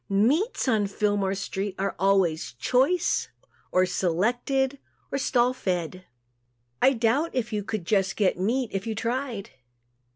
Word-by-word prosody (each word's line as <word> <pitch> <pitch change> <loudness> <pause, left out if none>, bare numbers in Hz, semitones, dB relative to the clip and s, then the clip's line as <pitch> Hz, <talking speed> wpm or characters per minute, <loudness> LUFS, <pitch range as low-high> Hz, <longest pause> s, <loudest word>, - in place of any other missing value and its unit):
Meats, 270 - +2
on 215 -5 +2
Fillmore 200 -1 0
street, 195 0 -4
are 195 +1 -2
always 190 -7 +2
"choice" 265 - +1 0.4
or 185 0 +4
"selected" 245 +10 0 0.3
or 275 - -1
"stall 250 -1 +2
fed." 185 -6 -3 0.8
I 270 - +6
doubt 245 +7 +1
if 240 -3 -1
you 210 -1 -1
could 215 -2 -4
get 195 0 +2
just 200 -5 +2
"meat" 235 +5 0
if 195 +2 -3
you 220 - -2
tried. 235 -2 -3
215 Hz, 135 wpm, -26 LUFS, 195-255 Hz, 0.8 s, I